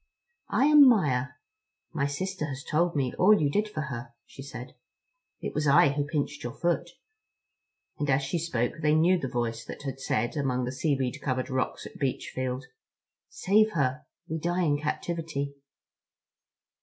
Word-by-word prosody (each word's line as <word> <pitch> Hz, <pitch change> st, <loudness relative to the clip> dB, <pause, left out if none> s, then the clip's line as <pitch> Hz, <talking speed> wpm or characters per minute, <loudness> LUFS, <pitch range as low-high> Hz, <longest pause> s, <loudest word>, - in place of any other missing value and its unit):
"I 270 Hz, -, +3 dB
am 295 Hz, -2 st, +8 dB
Maia. 145 Hz, -, +2 dB, 0.7 s
My 140 Hz, -, 0 dB
sister 185 Hz, +3 st, -3 dB
has 135 Hz, -1 st, -6 dB
told 170 Hz, +2 st, +1 dB
me 130 Hz, -3 st, 0 dB
all 210 Hz, +3 st, +6 dB
you 145 Hz, -2 st, +1 dB
did 210 Hz, +6 st, 0 dB
for 155 Hz, -, -4 dB
her," 120 Hz, -5 st, -6 dB
she -, -, -12 dB
said; 125 Hz, -2 st, -8 dB, 0.7 s
"it -, -, -4 dB
was 150 Hz, 0 st, 0 dB
I 140 Hz, 0 st, +6 dB
who 140 Hz, +1 st, -1 dB
pinched 150 Hz, -1 st, -2 dB
your 120 Hz, -, -4 dB
foot," 175 Hz, +1 st, 0 dB, 1.1 s
and 145 Hz, -, -1 dB
as 135 Hz, +1 st, +3 dB
she 135 Hz, +5 st, -1 dB
spoke 125 Hz, -8 st, -1 dB
they 150 Hz, 0 st, +3 dB
knew 175 Hz, +3 st, +4 dB
the 135 Hz, -, -3 dB
voice 120 Hz, -2 st, -2 dB
that -, -, -8 dB
had 135 Hz, -1 st, -5 dB
said, 120 Hz, -2 st, -1 dB
among 130 Hz, -4 st, 0 dB
the 125 Hz, -, -3 dB
seaweed 135 Hz, 0 st, -1 dB
covered 130 Hz, 0 st, -2 dB
rocks 130 Hz, 0 st, -2 dB
at -, -, -11 dB
Beachfield: 130 Hz, -1 st, -2 dB, 0.7 s
"Save 215 Hz, +3 st, +2 dB
her. 140 Hz, -1 st, -1 dB, 0.2 s
We 160 Hz, +1 st, -3 dB
die 175 Hz, +3 st, 0 dB
in 145 Hz, -3 st, +2 dB
captivity." 155 Hz, -2 st, -3 dB
145 Hz, 165 wpm, -28 LUFS, 130-165 Hz, 1.1 s, am